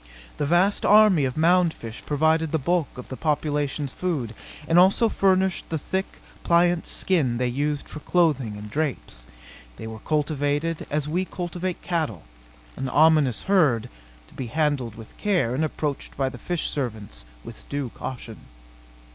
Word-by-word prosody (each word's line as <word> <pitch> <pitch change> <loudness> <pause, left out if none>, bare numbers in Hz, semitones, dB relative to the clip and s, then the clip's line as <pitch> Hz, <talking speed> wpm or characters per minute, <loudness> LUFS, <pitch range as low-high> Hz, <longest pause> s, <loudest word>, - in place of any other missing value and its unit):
The 145 - 0
vast 180 +5 +3
army 210 -8 +6
of 130 +1 -3
mound 170 +1 +3
fish 115 0 -9
provided 160 +1 +1
the 160 - +2
bulk 165 0 -1
of 125 - -9
the 130 - -5
population's 145 -2 -1
food, 145 -12 -2 0.3
and 165 +2 +5
also 195 +5 +5
furnished 190 -2 +1
the 160 - -1
thick, 190 +6 -2 0.4
pliant 175 0 +3
skin 145 -11 +1
they 125 - 0
used 145 +4 -2
for 155 - -8
clothing 145 -11 +1
and 105 +1 -8
drapes. 135 - -3 0.5
They - - -8
were 110 0 -7
cultivated 150 +2 -1
as 150 0 -1
we 175 +5 0
cultivate 180 0 -4
cattle 155 - -2 0.5
an 135 0 -3
ominous 150 -4 +4
herd, 155 - +2 0.4
to - - -19
be 130 - -5
handled 140 -4 -1
with 110 -1 -12
care 180 - +1
and 140 +5 0
approached 150 -2 -3
by 135 -1 +1
the 125 -2 -10
fish 175 +4 -2
servants 110 - -4 0.2
with - - -12
due 140 -3 -2
caution. 115 -2 -7
150 Hz, 155 wpm, -24 LUFS, 130-175 Hz, 0.5 s, army